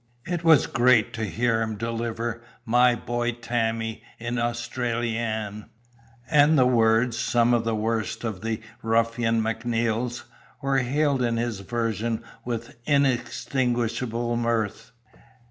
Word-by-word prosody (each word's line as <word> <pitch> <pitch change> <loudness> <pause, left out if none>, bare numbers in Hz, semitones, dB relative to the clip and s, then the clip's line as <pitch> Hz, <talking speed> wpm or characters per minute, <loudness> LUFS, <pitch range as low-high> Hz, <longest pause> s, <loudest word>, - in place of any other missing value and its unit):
It 175 -1 -3
was 160 -5 +6
great 120 -2 +3
to 110 -1 -2
hear 115 +2 0
him 110 -1 -2
deliver 115 +1 -3 0.2
My 120 +1 +4
Boy 120 +1 -2
Tammie 115 -1 -2 0.2
in 120 +1 -3
Austrylian; 115 -3 -2 0.6
and 150 0 +5
the 130 - +5
words 115 -1 +3
(some 120 0 +2
of 115 -1 +1
the 115 -1 0
worst 110 0 -2
of 110 -6 -4
the 110 0 -2 0.2
ruffian 115 0 +1
Macneil's) 115 +1 -1 0.4
were 135 0 +1
hailed 140 +2 +1
in 120 -1 +1
his 115 -3 -2
version 115 +2 -2 0.2
with 115 -1 -5
inextinguishable 120 -4 0
mirth. 115 -3 -1
115 Hz, 120 wpm, -25 LUFS, 115-120 Hz, 0.6 s, was